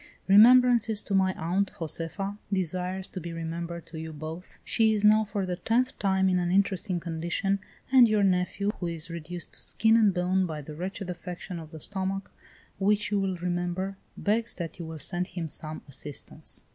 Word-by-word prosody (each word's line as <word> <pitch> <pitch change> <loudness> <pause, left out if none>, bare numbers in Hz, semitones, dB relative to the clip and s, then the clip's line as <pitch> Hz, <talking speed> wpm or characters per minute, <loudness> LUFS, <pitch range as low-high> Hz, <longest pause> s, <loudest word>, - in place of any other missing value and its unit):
"Remembrances 230 +1 +6
to 200 - -4
my 190 -1 +4
aunt; 185 +4 0
Josefa 175 +5 -4
desires 185 0 -1
to 185 - -6
be 170 +1 -6
remembered 165 +1 -5
to 165 -1 -8
you 160 0 -6
both; 160 +3 -8
she 220 -1 +3
is 210 0 +1
now 215 +1 +6
for 205 -2 -2
the 180 -1 -3
tenth 245 +6 0
time 190 -1 +2
in 180 -1 +3
an 175 -1 0
interesting 190 -1 +1
condition, 170 +4 -1 0.3
and 255 -3 +8
your 215 -1 +3
nephew, 190 +2 +1
who 175 - -2
is 165 0 -2
reduced 170 +1 -6
to - - -12
skin 225 0 +3
and 215 -3 +5
bone 185 +1 +1
by 155 -2 -5
the 150 +1 -8
wretched 185 +3 -4
affection 180 0 -7
of 160 -2 -9
the 160 - -9
stomach, 195 +2 -2 0.5
which 205 +2 +2
you 205 - +2
will 190 -2 -1
remember, 175 +2 -2 0.2
begs 225 +3 0
that 170 0 -6
you 170 - -5
will 160 0 -6
send 175 +4 -2
him 175 -2 -4
some 155 +1 -5
assistance. 140 +1 -7
185 Hz, 185 wpm, -28 LUFS, 170-200 Hz, 0.5 s, and